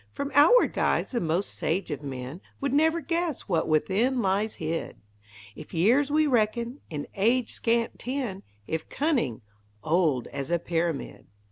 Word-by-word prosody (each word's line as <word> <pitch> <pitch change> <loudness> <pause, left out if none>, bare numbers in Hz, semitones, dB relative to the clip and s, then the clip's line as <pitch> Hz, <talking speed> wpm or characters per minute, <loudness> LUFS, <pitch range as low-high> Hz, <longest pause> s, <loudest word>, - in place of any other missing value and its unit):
From 280 0 -4
outward 330 +13 +6
guise - - +1
the 245 - 0
most 170 +3 -1
sage 175 0 -2
of 145 - -4
men 135 +4 -6 0.2
Would 275 -1 -1
never 320 +3 +3
guess 335 -1 -1
what 170 -5 -1
within 200 - +2
lies 205 +1 0
hid! 160 +1 -3 0.6
If - - -10
years 245 - +3
we 305 +1 +3
reckon, 235 0 0
in 150 -3 -4
age 230 +4 +2
scant 230 0 0
ten; 245 -7 -3 0.2
If 160 +5 -4
cunning, 255 - 0 0.4
old 155 -7 +2
as 140 -1 -5
a 170 - +2
pyramid. 170 -2 -3
210 Hz, 150 wpm, -27 LUFS, 165-270 Hz, 0.6 s, outward